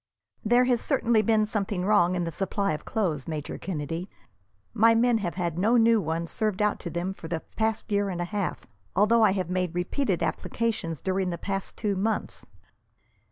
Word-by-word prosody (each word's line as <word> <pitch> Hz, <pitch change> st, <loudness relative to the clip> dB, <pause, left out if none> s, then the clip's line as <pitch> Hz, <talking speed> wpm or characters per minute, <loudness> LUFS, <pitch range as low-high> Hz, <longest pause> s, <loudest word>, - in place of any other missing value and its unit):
"There 240 Hz, +3 st, +4 dB
has 250 Hz, -2 st, +2 dB
certainly 235 Hz, -6 st, +2 dB
been 215 Hz, 0 st, +3 dB
something 200 Hz, -3 st, -2 dB
wrong 185 Hz, -3 st, +4 dB
in 175 Hz, -, 0 dB
the 165 Hz, -, -3 dB
supply 195 Hz, +1 st, -1 dB
of 150 Hz, -, -6 dB
clothes, 170 Hz, -, -1 dB
Major 155 Hz, -2 st, -4 dB
Kennedy. 165 Hz, +1 st, -4 dB, 0.6 s
My 230 Hz, 0 st, +5 dB
men 235 Hz, 0 st, +3 dB
have 175 Hz, -5 st, -3 dB
had 175 Hz, -2 st, -2 dB
no 225 Hz, +6 st, +4 dB
new 230 Hz, -1 st, +5 dB
ones 165 Hz, 0 st, -2 dB
served 215 Hz, -3 st, -1 dB
out 210 Hz, 0 st, +1 dB
to 170 Hz, -, -5 dB
them 175 Hz, +3 st, -3 dB
for 170 Hz, -, -9 dB
the 160 Hz, -1 st, -3 dB
past 220 Hz, 0 st, -1 dB
year 200 Hz, -1 st, +1 dB
and 180 Hz, -2 st, -4 dB
a 175 Hz, -, -1 dB
half, 200 Hz, +1 st, -3 dB, 0.3 s
although 210 Hz, +4 st, +4 dB
I 200 Hz, -, +5 dB
have 185 Hz, -3 st, -2 dB
made 180 Hz, -2 st, -1 dB
repeated 185 Hz, -, 0 dB
applications 210 Hz, -9 st, -2 dB
during 190 Hz, -1 st, 0 dB
the 170 Hz, -, -3 dB
past 195 Hz, +2 st, -4 dB
two 205 Hz, -3 st, -1 dB
months." 210 Hz, +3 st, -2 dB
195 Hz, 190 wpm, -27 LUFS, 175-220 Hz, 0.6 s, My